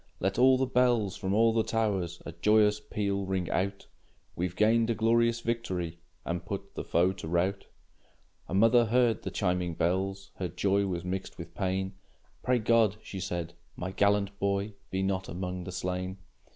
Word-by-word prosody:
Let 95 +4 0
all 130 +1 +6
the 130 - +1
bells 120 -6 +2
from 95 - -3
all 115 +1 +4
the 115 - +3
towers 100 -7 -1
A - - -5
joyous 105 +3 +3
peal 100 -2 -2
ring 95 -2 -2
out; 100 +1 -1 0.5
We've 90 +1 -2
gained 115 +2 +3
a 115 - +1
glorious 115 +1 +2
victory, 95 -8 -3 0.3
And 85 +1 -2
put 100 +1 -6
the - - -4
foe 90 +3 +2
to 90 -4 -8
rout! 90 +4 0 0.8
A 95 - -3
mother 115 +4 +5
heard 120 0 +2
the - - -4
chiming 90 -3 -1
bells; 95 +3 -1
Her 95 - -2
joy 100 +4 +1
was 90 -2 -3
mixed 95 +1 -4
with - - -9
pain. 95 +1 -1 0.5
"Pray 125 0 +2
God," 115 -2 +3
she 95 - -7
said, 85 -2 -4 0.2
"my 90 +1 -4
gallant 100 0 +1
boy 100 +1 0 0.2
Be 95 0 -1
not 95 -1 -1
among 90 0 -4
the 95 - -5
slain!" 90 +1 -3
100 Hz, 175 wpm, -29 LUFS, 90-110 Hz, 0.8 s, all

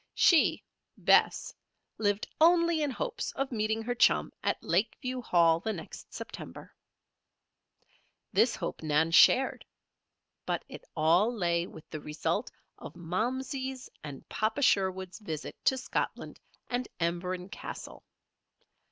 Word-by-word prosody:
She, 335 -4 +4 0.3
Bess, - - +3 0.5
lived 205 -1 +1 0.2
only 335 -1 +5
in 295 - +1
hopes 475 - -3
of 270 0 -2
meeting 220 -1 -1
her 245 +2 -1
chum 240 - +3
at - - +1
Lakeview 230 +8 -1
Hall 170 -6 +4
the 220 +5 -2
next 165 -5 -9
September. - - -9 1.6
This - - +3
hope - - -5
Nan 155 +1 +2
shared. 260 +10 +5 0.8
But - - -1
it - - -10
all 170 +8 +4
lay 175 -6 0
with 160 - -13
the 155 - -5
result 150 0 -2 0.3
of - - -9
Momsey's 255 +9 -3
and 145 -3 -9
Papa 220 +7 -1
Sherwood's 190 -3 +1
visit 160 -8 -6
to 265 - +4
Scotland 260 - -3 0.3
and 245 0 -2
Emberon 180 +2 -2
Castle. - - -8
210 Hz, 120 wpm, -30 LUFS, 170-255 Hz, 1.6 s, only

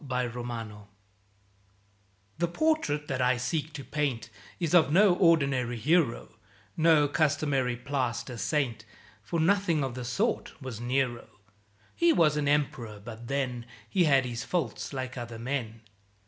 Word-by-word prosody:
Nero 120 -4 -4 1.5
The 170 - +2
portrait 170 - 0
that 130 -2 -2
I 125 0 +3
seek 145 +5 -2
to 145 -2 -7
paint 125 -5 -2 0.3
Is 170 -2 -1
of 160 -5 +5
no 195 +3 +6
ordinary 140 -9 +2
hero, 150 +1 +1 0.4
No 160 -2 +4
customary 140 -4 +1
plaster 125 -2 -3
saint, 120 -4 -1 0.4
For 165 +10 -3
nothing 170 -3 +2
of 130 -2 -3
the 125 0 -6
sort 195 - -2
was 130 -5 -7
Nero. 125 -1 -1 0.7
(He 340 0 +4
was 155 - +4
an 150 -1 0
Emperor, 125 -7 0
but 110 +3 -10
then 125 -3 -2 0.2
He 185 -3 +2
had 135 -3 +4
his 120 -1 -4
faults 160 -12 -2
like 130 -2 -5
other 120 -1 -7
men.) 115 -2 -4
135 Hz, 135 wpm, -28 LUFS, 120-155 Hz, 1.5 s, no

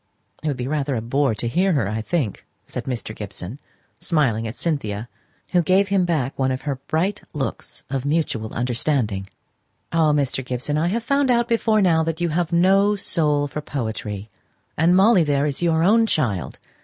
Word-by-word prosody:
"It 155 - -3
would 140 -3 -1
be 125 0 -3
rather 140 -2 -1
a 115 - -1
bore 135 0 +1
to 105 - -4
have 115 - -1
to - - -14
hear 190 0 +3
her, 135 -10 +1
I 110 +2 -2
think," 130 - -2 0.2
said - - -5
Mr. 120 -4 -4
Gibson, 100 +3 -7 0.4
smiling 120 -9 +1
at 110 - -6
Cynthia, 120 -7 -2 0.4
who 175 - +3
gave 190 +4 +3
him 195 -2 +2
back 150 -7 0
one 130 0 +2
of 130 +1 -3
her 140 -3 -2
bright 190 +6 0
looks 145 -4 -4
of 135 -2 -2
mutual 145 -7 -1
understanding. 120 -5 -1 0.6
"Ah, 160 -2 +3
Mr. 140 -2 0
Gibson, 130 +4 -3
I 155 +3 +1
have 225 +6 -1
found 280 +1 +2
out 240 -1 +3
before 225 -2 +2
now 165 -3 +4
that 160 0 -2
you 175 -1 0
have 170 +1 -1
no 195 +4 +4
soul 150 -7 +1
for 150 +2 -5
poetry; 110 -7 -4 0.4
and 170 +3 +4
Molly 195 -1 +6
there 145 -1 +1
is 145 0 -2
your 165 -2 +2
own 225 +5 +4
child. 100 - -1
150 Hz, 190 wpm, -22 LUFS, 125-175 Hz, 0.6 s, Molly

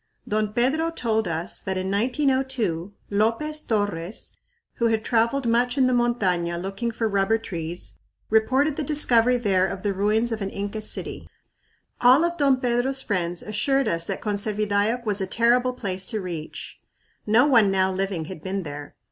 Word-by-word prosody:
Don 215 0 0
Pedro 270 +9 +1
told 220 - -1
us 165 +1 -3
that 190 -1 -3
in 185 +1 -2
1902 245 - 0 0.2
Lopez 230 +9 +1
Torres, 205 - -3 0.5
who 235 - +2
had 225 0 0
traveled 235 +3 +1
much 245 +3 +2
in 265 - +4
the 255 - +2
montaña 185 -8 +1
looking 195 +6 -3
for 230 0 -1
rubber 200 +1 +2
trees, 170 -5 -7 0.3
reported 265 +7 +2
the 310 - -1
discovery 250 -5 +3
there 190 -5 +2
of 190 +1 -6
the 205 -1 0
ruins 215 +4 +1
of 220 -1 -3
an 195 - -2
Inca 200 +2 -4
city. - - -5 0.7
All 255 +6 +6
of 345 0 -1
Don 275 -4 +3
Pedro's 255 +2 +1
friends 175 -4 -2
assured 270 +6 +1
us 165 0 -1
that - - -4
Conservidayoc 210 +2 0
was 205 -2 0
a 190 - -1
terrible 245 +4 +2
place 190 -6 -4
to 220 - 0
reach. 170 -5 -7 0.5
"No 225 +5 +5
one 230 -8 +5
now 190 0 +2
living 190 -3 -2
had 175 -1 -8
been 190 +2 -3
there." 145 -1 -8
215 Hz, 165 wpm, -24 LUFS, 190-245 Hz, 0.7 s, All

